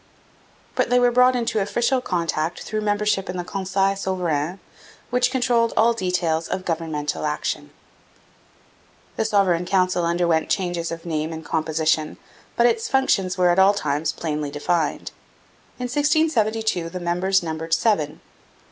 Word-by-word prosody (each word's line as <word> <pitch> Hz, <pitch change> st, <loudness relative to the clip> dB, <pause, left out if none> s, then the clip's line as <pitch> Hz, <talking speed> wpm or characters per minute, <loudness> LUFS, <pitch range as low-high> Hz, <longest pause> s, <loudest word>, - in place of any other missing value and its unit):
But -, -, 0 dB
they 245 Hz, -, +4 dB
were 245 Hz, 0 st, +4 dB
brought 250 Hz, +1 st, +5 dB
into 230 Hz, -3 st, 0 dB
official 240 Hz, +6 st, +1 dB
contact 170 Hz, -5 st, -2 dB
through 215 Hz, 0 st, -3 dB
membership 205 Hz, -2 st, 0 dB
in 180 Hz, -, -4 dB
the 175 Hz, -, -2 dB
Conseil 195 Hz, +1 st, 0 dB
Souverain, 180 Hz, -4 st, -2 dB, 0.5 s
which 250 Hz, 0 st, +2 dB
controlled 245 Hz, -3 st, +1 dB
all 230 Hz, +2 st, +5 dB
details 180 Hz, -6 st, -1 dB
of 185 Hz, 0 st, -4 dB
governmental 160 Hz, -3 st, -2 dB
action. 150 Hz, 0 st, -2 dB, 1.5 s
The 220 Hz, -, -1 dB
Sovereign 185 Hz, -5 st, +2 dB
Council 185 Hz, -2 st, +2 dB
underwent 170 Hz, -1 st, +1 dB
changes 175 Hz, -3 st, -1 dB
of 165 Hz, 0 st, -7 dB
name 160 Hz, -1 st, -2 dB
and 160 Hz, 0 st, -7 dB
composition, 155 Hz, -1 st, 0 dB, 0.4 s
but 235 Hz, -, +3 dB
its 230 Hz, -1 st, +2 dB
functions 195 Hz, -9 st, +1 dB
were 180 Hz, -1 st, +4 dB
at 175 Hz, -, +2 dB
all 195 Hz, +2 st, +5 dB
times 150 Hz, -4 st, -1 dB
plainly 150 Hz, -3 st, -3 dB
defined. 150 Hz, +2 st, -1 dB, 0.7 s
In 250 Hz, -, -6 dB
1672 240 Hz, -, +1 dB
the 180 Hz, +2 st, -6 dB
members 180 Hz, +2 st, +1 dB
numbered 165 Hz, 0 st, -1 dB
seven. 160 Hz, -10 st, 0 dB
185 Hz, 140 wpm, -22 LUFS, 165-220 Hz, 1.5 s, brought